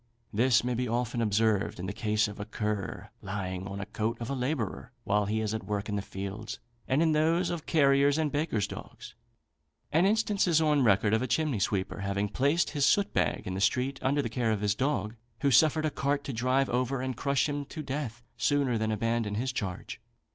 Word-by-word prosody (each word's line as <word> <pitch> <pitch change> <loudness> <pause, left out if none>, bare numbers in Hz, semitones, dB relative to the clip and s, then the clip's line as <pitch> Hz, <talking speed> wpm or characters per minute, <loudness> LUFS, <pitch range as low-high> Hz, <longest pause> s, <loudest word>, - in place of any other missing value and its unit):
This 120 +3 +4
may 125 0 0
be 125 +1 -1
often 120 +1 -1
observed 110 -2 +1
in 90 - -4
the 95 - -3
case 110 -1 +1
of 105 0 -9
a 105 - -4
cur, 105 -2 -3
lying 95 -2 -4
on 100 0 -6
the 100 - -4
coat 110 +2 -2
of 120 +2 -4
a - - 0
labourer 125 -4 -2
while 105 -1 +1
he 110 +1 0
is 110 -1 -1
at 110 - -4
work 105 0 -2
in 105 - -1
the 100 - -1
fields, 100 +3 -6 0.3
and 135 +5 +3
in 160 - +3
those 165 +3 +2
of 170 -3 -5
carriers' 140 -1 +4
and 155 -2 0
bakers' 145 -9 0
dogs. - - -9 0.8
An 165 +5 +4
instance 210 -2 +2
is 165 -3 +4
on 150 -3 +3
record 105 -1 +3
of 110 - +3
a 130 - -1
chimney 140 -1 0
sweeper 95 +1 -1
having 100 +1 -1
placed 145 +9 +1
his 145 -2 -1
soot 200 0 +2
bag - - 0
in 95 - -3
the 95 - -3
street 130 +5 +1
under 140 +2 +1
the - - -1
care 115 0 0
of 105 -2 -1
his 105 -1 +2
dog, 110 -3 -1 0.3
who 140 - +3
suffered 155 +4 +4
a 155 - 0
cart 140 +1 -1
to 140 - -5
drive 130 +4 +1
over 130 +2 0
and 130 0 -3
crush 140 +3 +1
him 145 -1 -2
to 155 +2 -7
death, 130 -4 -4
sooner 125 -1 +1
than 110 0 0
abandon 115 -1 -1
his 125 +4 -1
charge. 95 -6 -5
120 Hz, 220 wpm, -29 LUFS, 105-140 Hz, 0.8 s, This